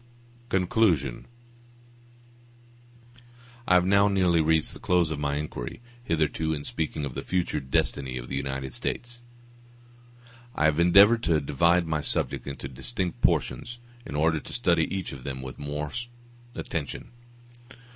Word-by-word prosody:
Conclusion 90 - +1 2.4
I 90 - +5
have 90 0 +5
now 100 +1 +5
nearly 90 -4 +3
reached 80 0 +2
the - - -9
close 90 -3 +2
of 75 - -3
my 70 -1 -1
inquiry; 75 - -5 0.2
hitherto, 80 -3 0
in 70 - -6
speaking 75 -1 -3
of 65 - -6
the - - -4
future 90 -4 -1
destiny 65 -1 -1
of - - -6
the 70 - -4
United 65 -1 -3
States, 120 0 -4 1.3
I 75 - +2
have 80 +1 +3
endeavored 100 +7 +7
to 80 -2 +3
divide 85 +5 +2
my 80 -2 -1
subject - - -2
into 70 - -5
distinct 90 - -4
portions, 120 - 0 0.3
in 70 - -7
order 80 +1 +2
to - - -10
study 85 -9 +2
each 95 -2 -3
of 65 -2 -9
them 65 -1 -5
with 65 - -8
more 75 +1 -4 0.6
attention. 75 -5 -5
80 Hz, 140 wpm, -27 LUFS, 70-90 Hz, 2.4 s, endeavored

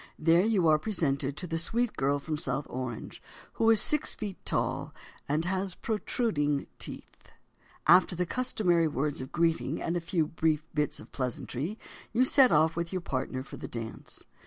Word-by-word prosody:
There 165 +3 +4
you 205 -6 +3
are 155 -1 +5
presented 145 -7 -1
to 180 - -5
the 165 -1 -2
sweet 230 +7 0
girl 140 +1 +1
from 155 +2 -3
South 140 -1 -2
Orange, 125 -3 -5 0.3
who 225 - +2
is 225 -2 +7
six 300 +7 +2
feet 205 -4 -6
tall - - -1 0.3
and 155 +3 +1
has 190 0 -1
protruding 205 - -1
teeth. - - -8 0.6
After 185 0 +6
the 180 +1 0
customary 175 -7 +1
words 145 -1 -1
of 130 - -7
greeting 165 -1 +1
and 170 - -2
a 175 - 0
few 165 -1 0
brief 155 -1 0
bits 150 -1 0
of - - -13
pleasantry, 135 - -3 0.4
you 250 +3 +4
set 260 -1 +5
off 160 +1 +4
with 170 0 -2
your 185 -1 -2
partner 130 -3 -3
for - - -10
the - - -6
dance. 115 -1 -7
165 Hz, 175 wpm, -29 LUFS, 145-190 Hz, 0.6 s, is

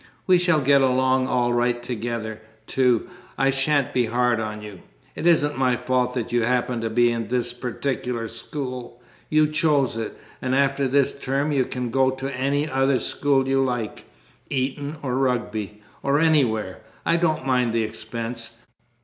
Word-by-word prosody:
We 180 -1 +5
shall 175 -4 +3
get 140 +1 +4
along 130 0 +2
all 120 -1 +1
right 120 0 +1
together, 115 -2 -4 0.2
too. 125 +1 +2 0.3
I 135 0 +3
shan't 135 0 +1
be 125 -2 +2
hard 120 0 +1
on 105 -1 -4
you. 105 -4 -9 0.3
It 165 - -2
isn't 145 -4 +3
my 125 -2 +2
fault 125 0 0
that 120 -3 -3
you 120 0 +2
happen 125 0 0
to 115 - -1
be 120 +1 +3
at 115 -1 -4
this 120 -1 -1
particular 125 -1 -3
school 125 0 -6 0.3
you 155 0 +4
chose 150 -5 +1
it! 110 -1 -5 0.2
And 130 0 0
after 140 0 +2
this 140 +1 +2
term 140 +2 -1
you 135 -3 +2
can 125 -2 -4
go 130 +1 +3
to 135 +1 -4
any 140 +3 0
other 135 -1 +2
school 135 -2 +1
you 135 0 +2
like 120 -4 -3 0.4
Eton 140 +3 -2
or 125 -3 -1
Rugby, 110 -5 -2 0.2
or 140 +1 +2
anywhere. 125 - +2 0.3
I 170 - +3
don't 160 -4 0
mind 125 -3 +2
the 115 0 +1
expense. 115 +1 -6
125 Hz, 165 wpm, -23 LUFS, 120-140 Hz, 0.4 s, We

